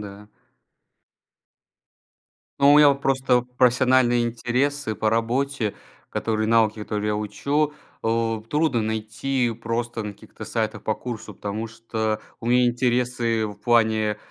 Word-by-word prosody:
да. 105 Hz, 0 st, -10 dB, 2.3 s
Но 140 Hz, +1 st, +6 dB
у 145 Hz, -, +7 dB
меня 150 Hz, -1 st, +8 dB
вот 140 Hz, 0 st, 0 dB
просто 130 Hz, -2 st, +2 dB
профессиональные 125 Hz, -1 st, +3 dB
интересы 125 Hz, +2 st, -1 dB
по 110 Hz, 0 st, 0 dB
работе, 120 Hz, 0 st, 0 dB, 0.4 s
которые 110 Hz, -1 st, -1 dB
навыки, 110 Hz, -1 st, +3 dB
которые 105 Hz, 0 st, -3 dB
я 105 Hz, -, 0 dB
учу, 145 Hz, +8 st, -1 dB, 0.3 s
э, 115 Hz, -1 st, 0 dB
трудно 150 Hz, -6 st, +1 dB
найти 115 Hz, +4 st, -1 dB
просто 115 Hz, 0 st, -3 dB
на 105 Hz, -1 st, -5 dB
каких-то -, -, -12 dB
сайтах 110 Hz, -2 st, -2 dB
по 110 Hz, -, 0 dB
курсу. 110 Hz, -4 st, -7 dB
Потому 105 Hz, +3 st, -4 dB
что 110 Hz, -1 st, -3 dB, 0.2 s
у 115 Hz, -, -7 dB
меня 125 Hz, 0 st, +4 dB
интересы 120 Hz, -2 st, 0 dB
в 105 Hz, -, -7 dB
плане, 110 Hz, -2 st, +2 dB
115 Hz, 130 wpm, -23 LUFS, 110-125 Hz, 2.3 s, меня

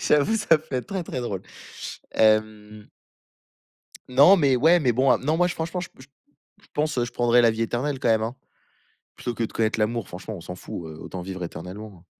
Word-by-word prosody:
j'avoue, 150 Hz, +10 st, +3 dB
ça 165 Hz, -7 st, +4 dB
peut-être 130 Hz, -5 st, -5 dB
très, 195 Hz, -2 st, -3 dB
très 130 Hz, -, -4 dB
drôle. 100 Hz, -6 st, -4 dB, 0.7 s
Hem 110 Hz, -1 st, +1 dB, 1.2 s
non, 140 Hz, +9 st, +7 dB
mais 140 Hz, -6 st, +3 dB
ouais, 165 Hz, +7 st, +5 dB
mais 130 Hz, -6 st, +2 dB
bon, 130 Hz, +2 st, +3 dB
heu, -, -, +2 dB
non, 155 Hz, +4 st, +1 dB
moi 175 Hz, +1 st, +3 dB
j 175 Hz, -, -3 dB
franchement, 170 Hz, +3 st, -3 dB
j 180 Hz, -, -5 dB
je 135 Hz, -, -19 dB, 0.5 s
pense, 150 Hz, 0 st, 0 dB
heu, 120 Hz, -, +2 dB
je 120 Hz, -, -6 dB
prendrai 120 Hz, 0 st, +3 dB
la 115 Hz, -, +5 dB
vie 110 Hz, +1 st, -2 dB
éternelle 130 Hz, +5 st, -2 dB
quand 130 Hz, -, 0 dB
même, 110 Hz, -1 st, +3 dB
hein. 115 Hz, +3 st, -3 dB, 0.8 s
Plutôt 120 Hz, -, -5 dB
que 115 Hz, -, -2 dB
de -, -, -6 dB
connaître 110 Hz, 0 st, 0 dB
l'amour, 110 Hz, -1 st, -1 dB
franchement, 95 Hz, +5 st, -7 dB
on -, -, -9 dB
s'en 90 Hz, +2 st, -8 dB
fout, 85 Hz, -, -7 dB
heu, 80 Hz, 0 st, -10 dB
autant 90 Hz, +2 st, -7 dB
vivre 95 Hz, 0 st, -6 dB
éternellement, 95 Hz, +5 st, -8 dB
hein. 85 Hz, -, -25 dB
120 Hz, 210 wpm, -24 LUFS, 110-145 Hz, 1.2 s, non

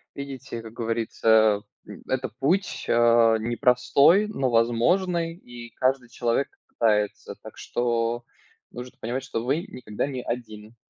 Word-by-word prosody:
Видите, 135 Hz, -4 st, -7 dB
как 115 Hz, 0 st, -11 dB
говорится, 110 Hz, -2 st, +2 dB, 0.3 s
м, -, -, -11 dB
это 130 Hz, 0 st, -1 dB
путь, 180 Hz, +9 st, 0 dB
а, 115 Hz, -1 st, +5 dB
непростой, 135 Hz, -, +3 dB
но 135 Hz, -12 st, -1 dB
возможный, 165 Hz, +10 st, +1 dB
и 120 Hz, -7 st, -11 dB
каждый 130 Hz, -1 st, 0 dB
человек 120 Hz, +2 st, -1 dB, 0.2 s
пытается. 105 Hz, -3 st, 0 dB
Так -, -, -12 dB
что 120 Hz, 0 st, -1 dB, 0.5 s
нужно 125 Hz, +1 st, -9 dB
понимать, 125 Hz, +4 st, -3 dB
что 115 Hz, -4 st, -4 dB
вы 145 Hz, +8 st, -1 dB
никогда 105 Hz, -1 st, -4 dB
не 130 Hz, -3 st, -4 dB
один 110 Hz, -2 st, -6 dB
120 Hz, 125 wpm, -25 LUFS, 115-135 Hz, 0.5 s, а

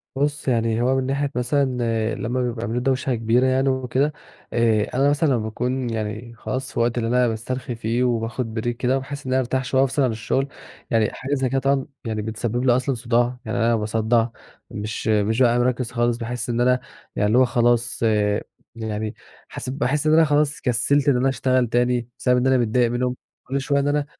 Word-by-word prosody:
بُصّ، 145 Hz, +2 st, -1 dB
يعني 115 Hz, -2 st, +1 dB
هو 130 Hz, +2 st, +2 dB
من 130 Hz, -1 st, 0 dB
ناحية 140 Hz, +1 st, -1 dB
مثلًا 125 Hz, +3 st, +1 dB, 0.5 s
لما 125 Hz, +3 st, -2 dB
بيبقى 120 Hz, -2 st, -2 dB
عاملين 120 Hz, +1 st, -2 dB
دوشة 130 Hz, -1 st, 0 dB
كبيرة 115 Hz, +3 st, +2 dB
يعني 130 Hz, +1 st, +2 dB
وكده 130 Hz, +3 st, 0 dB, 0.4 s
آآ، 110 Hz, -2 st, +3 dB
أنا 140 Hz, +2 st, +4 dB
مثلًا 145 Hz, +2 st, +2 dB
لمّا 130 Hz, -, +3 dB
باكون 125 Hz, +3 st, -2 dB
يعني 110 Hz, +1 st, -4 dB
خلاص 130 Hz, +1 st, -4 dB
في -, -, -10 dB
الوقت 120 Hz, +1 st, +1 dB
اللي 115 Hz, -1 st, 0 dB
أنا 125 Hz, 0 st, +3 dB
باسترخي 120 Hz, +2 st, -4 dB
فيه 115 Hz, +2 st, -1 dB
وباخُد 115 Hz, -1 st, -1 dB
break -, -, +2 dB
كده 125 Hz, +2 st, 0 dB
بحيث 140 Hz, +2 st, -7 dB
إن 130 Hz, -, -1 dB
أنا 130 Hz, -, +3 dB
أرتاح 130 Hz, +1 st, -1 dB
شوية 130 Hz, +2 st, +1 dB
وأفصِل 135 Hz, +1 st, +1 dB
عن 125 Hz, -, +2 dB
الشغل، 115 Hz, +5 st, -1 dB, 0.4 s
يعني 110 Hz, -3 st, +3 dB
حاجة 135 Hz, +2 st, -4 dB
زي 130 Hz, -3 st, 0 dB
كده 135 Hz, -, +1 dB
طبعًا 135 Hz, 0 st, +1 dB, 0.2 s
يعني 110 Hz, -1 st, -2 dB
بتسبب 115 Hz, +3 st, -2 dB
لي 120 Hz, -2 st, +5 dB
أصلًا 130 Hz, +1 st, 0 dB
صُداع، 120 Hz, +1 st, 0 dB
يعني -, -, -2 dB
أنا 115 Hz, 0 st, +3 dB
باصدّع، 110 Hz, +1 st, +1 dB, 0.4 s
مش 105 Hz, +2 st, -5 dB
مش 110 Hz, +2 st, +2 dB
بابقى 120 Hz, -1 st, +4 dB
مركّز 125 Hz, 0 st, 0 dB
خالص، 120 Hz, -1 st, +1 dB
باحس 120 Hz, +1 st, -4 dB
إن 120 Hz, +1 st, 0 dB
أنا 125 Hz, +1 st, +3 dB, 0.4 s
يعني 105 Hz, -, +1 dB
اللي 110 Hz, +4 st, +3 dB
هو 130 Hz, -, +6 dB
خلاص، 120 Hz, 0 st, +1 dB, 0.7 s
يعني 110 Hz, -1 st, -4 dB, 0.3 s
حس -, -, -6 dB
باحس 140 Hz, +2 st, 0 dB
إن 155 Hz, -, +4 dB
أنا 160 Hz, 0 st, +6 dB
خلاص 150 Hz, 0 st, +1 dB
كسّلت 140 Hz, +4 st, +2 dB
إن 130 Hz, -, +3 dB
أنا 135 Hz, +2 st, +2 dB
أشتغل 130 Hz, -2 st, +1 dB
تاني 120 Hz, 0 st, +1 dB
بسبب 125 Hz, -1 st, +3 dB
إن 125 Hz, -, +2 dB
أنا 130 Hz, 0 st, +4 dB
متضايق 120 Hz, 0 st, +2 dB
منهُم 125 Hz, +1 st, -1 dB, 0.3 s
كل 135 Hz, +1 st, -2 dB
شوية، 140 Hz, +1 st, +1 dB
إن 140 Hz, -, 0 dB
أنا، 145 Hz, 0 st, +1 dB
125 Hz, 205 wpm, -22 LUFS, 115-130 Hz, 0.7 s, هو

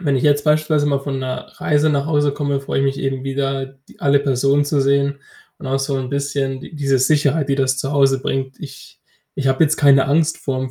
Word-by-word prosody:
wenn 145 Hz, -6 st, 0 dB
ich 130 Hz, -, -1 dB
jetzt 145 Hz, -1 st, +2 dB
beispielsweise 155 Hz, -1 st, +2 dB
mal 140 Hz, -1 st, +1 dB
von 135 Hz, -1 st, -4 dB
'ner 130 Hz, -1 st, -5 dB
Reise 150 Hz, +1 st, +2 dB
nach 140 Hz, -1 st, 0 dB
Hause 145 Hz, -2 st, +1 dB
komme, 145 Hz, -1 st, -1 dB
freue 135 Hz, -, -3 dB
ich 135 Hz, -, +1 dB
mich 135 Hz, 0 st, -1 dB
eben 135 Hz, -1 st, -2 dB
wieder, 135 Hz, 0 st, -2 dB
die 135 Hz, 0 st, -21 dB
alle 140 Hz, 0 st, +3 dB
Personen 140 Hz, +1 st, +1 dB
zu 145 Hz, 0 st, 0 dB
sehen 140 Hz, +1 st, +1 dB, 0.4 s
und -, -, -9 dB
auch 135 Hz, +1 st, 0 dB
so 135 Hz, +1 st, -2 dB
'n 130 Hz, -1 st, -4 dB
bisschen 140 Hz, -1 st, -2 dB
die -, -, -11 dB
diese 135 Hz, -3 st, +1 dB
Sicherheit, 145 Hz, +2 st, +1 dB
die -, -, +3 dB
das 130 Hz, -1 st, 0 dB
zu 135 Hz, +2 st, -3 dB
Hause 135 Hz, -1 st, +3 dB
bringt. 135 Hz, -1 st, -3 dB
Ich 135 Hz, -3 st, -11 dB, 0.4 s
ich 140 Hz, -, -3 dB
habe 135 Hz, +3 st, +2 dB
jetzt 155 Hz, 0 st, +2 dB
keine 140 Hz, -2 st, +4 dB
Angst 155 Hz, +3 st, +1 dB
vorm 130 Hz, -1 st, -3 dB
140 Hz, 230 wpm, -19 LUFS, 135-145 Hz, 0.4 s, keine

